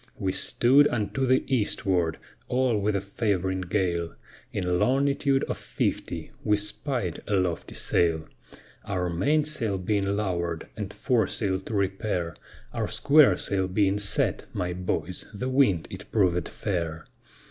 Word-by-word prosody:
We 95 -6 -1
stood 135 +9 +4
unto 120 +4 -1
the 130 +1 +3
eastward, 95 -8 0 0.3
all 125 -2 +2
with 105 +1 0
a 100 - 0
favoring 95 -2 -1
gale, 85 -3 -1 0.4
In 90 -2 0
longitude 140 +2 +2
of - - -3
fifty - - -3
we 105 0 +3
spied 105 - -1
a 105 - +1
lofty 90 -3 -1
sail: 80 -2 +1 0.6
Our 90 -3 -2
mainsail 120 - 0
being 100 +1 0
lower'd 85 -5 -2
and 105 -2 -5
foresail 105 -4 0
to 105 +3 -6
repair, 95 -4 -1 0.4
Our - - -1
squaresail 100 -10 +3
being 100 0 +2
set, 100 -1 0
my 90 0 -2
boys, 90 0 -3
the 125 +6 -3
wind 130 - +3
it 95 +1 -9
provèd 90 -5 +2
fair. 85 -5 -3
100 Hz, 130 wpm, -26 LUFS, 90-115 Hz, 0.6 s, stood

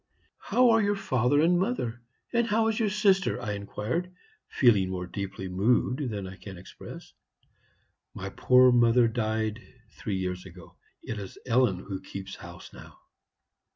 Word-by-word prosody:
"'How 250 -1 +3
are 225 0 +4
your 205 0 +1
father 135 - +1
and 175 +2 +3
mother, 125 - -2 0.3
and 235 -1 +2
how 220 +1 +2
is 220 - -1
your 220 -2 +2
sister?' 195 -5 +2
I 120 -4 -4
inquired, 105 - -3 0.4
feeling 105 -8 +3
more 90 -1 -4
deeply 95 0 -6
moved 125 +8 +1
than 100 -3 -4
I 95 +1 -9
can 95 -3 -10
express. 90 - -11 1.0
"'My - - -5
poor 125 0 +5
mother 120 0 +5
died 110 -1 -2 0.3
three 100 -3 -4
years 90 -1 -3
ago. 90 -1 -14 0.3
It 110 - -5
is 100 -2 -9
Ellen 120 -6 +2
who 95 -1 -6
keeps 95 0 -8
house 85 -1 -11
now.' - - -13
115 Hz, 155 wpm, -28 LUFS, -, 1.0 s, poor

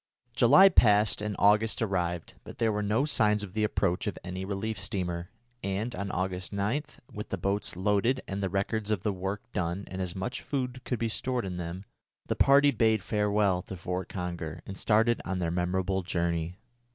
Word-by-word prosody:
July 140 - +8
passed 105 - +4
and 105 -1 -2
August 105 +2 +4
arrived, 90 -6 -1
but - - -11
there 115 -1 +2
were 105 0 -1
no 105 +6 +1
signs 105 -7 +2
of 95 -3 -8
the 110 0 0
approach 100 -2 0
of 105 - -3
any 95 0 -5
relief 100 +2 -3
steamer, 90 -2 -2 0.3
and, 100 +5 -2
on 100 -3 -4
August 95 0 -2
9, 105 +8 0 0.3
with 105 - -6
the 100 - -2
boats 100 +2 -2
loaded 105 +7 +1
with 100 +1 -3
the 95 - 0
records 100 +3 -1
of 105 -4 0
the 105 - 0
work 95 +2 -4
done 90 +2 -2
and 95 0 -6
as 90 -2 -3
much 95 +7 -4
food 130 -3 -3
as - - -11
could 125 - -1
be 115 - -1
stored 125 +1 -1
in 90 -2 -4
them, 90 +3 -5 0.4
the - - -1
party 140 +1 +6
bade 110 -4 +2
farewell 105 -3 +1
to 95 - -8
Fort 90 +1 -4
Conger 85 -3 -5
and 95 - -7
started 115 +3 +2
on 95 +1 -3
their 85 -2 -1
memorable 90 +2 0
journey. 85 -1 -2
100 Hz, 195 wpm, -29 LUFS, 90-110 Hz, 0.4 s, July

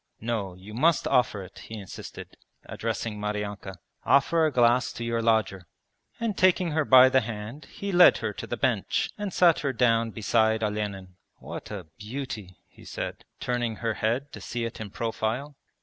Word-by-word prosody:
'No, 110 -5 -3
you 95 +4 -12
must 155 +7 +2
offer 110 -5 +2
it,' 90 - -13
he 110 - -9
insisted, 100 -3 -9 0.3
addressing 105 -2 -4
Maryanka. 105 -2 -4 0.3
'Offer 160 +3 +4
a - - -1
glass 120 -1 +3
to 120 - -6
your 115 0 -1
lodger.' 110 -6 +1 0.5
And 230 -3 -1
taking 185 -2 +3
her 155 +1 +1
by 130 -1 +8
the 130 0 +4
hand 115 +5 -7
he 200 0 -6
led 180 -1 +7
her - - -3
to - - -7
the - - -3
bench - - 0
and 205 -2 -3
sat 170 -2 +4
her 140 -2 -1
down 115 -2 +2
beside 110 0 +1
Olenin. 100 -3 -3 0.2
'What - - -8
a 100 -4 -6
beauty,' 110 -4 -6
he - - -18
said, - - -6
turning 120 -2 -1
her 115 0 -2
head 120 +7 -1
to - - -8
see 120 -1 -3
it 115 - -6
in 105 - -5
profile. 115 +6 -3
115 Hz, 175 wpm, -27 LUFS, 105-135 Hz, 0.5 s, by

